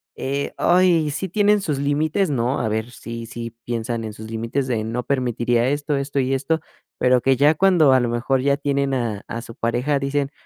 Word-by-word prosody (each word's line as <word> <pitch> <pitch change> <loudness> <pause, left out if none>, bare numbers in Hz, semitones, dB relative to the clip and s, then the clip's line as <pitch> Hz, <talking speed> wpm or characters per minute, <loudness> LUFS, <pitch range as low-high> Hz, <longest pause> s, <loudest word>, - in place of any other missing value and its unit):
eh, 140 +1 -3
ay, 175 -3 +3
sí 150 +6 -3
tienen 205 +2 +3
sus 150 -7 -2
límites, 155 +6 +1
¿no?, 125 -1 0
a 110 - -1
ver 110 +2 -2
sí 115 -1 -7
sí 115 0 -6
piensan 115 -1 -3
en 110 -1 -6
sus 110 +1 -10
límites, 115 +4 -2
de: 115 -4 -1
"No 115 +3 -2
permitiría 120 -2 0
esto, 145 +2 -1
esto 140 0 -2
y 135 0 +1
esto", 140 +5 0 0.4
pero 125 0 +3
que 135 +1 +3
ya 145 +4 +4
cuando, 175 -5 +4
a 130 - +5
lo 120 - 0
mejor, 120 +3 0
ya 140 +1 +2
tienen 140 -1 0
a 115 -5 -2
a 115 0 -5
su 115 -1 -11
pareja 125 +5 0
dicen: 140 0 -1
135 Hz, 205 wpm, -22 LUFS, 120-145 Hz, 0.4 s, a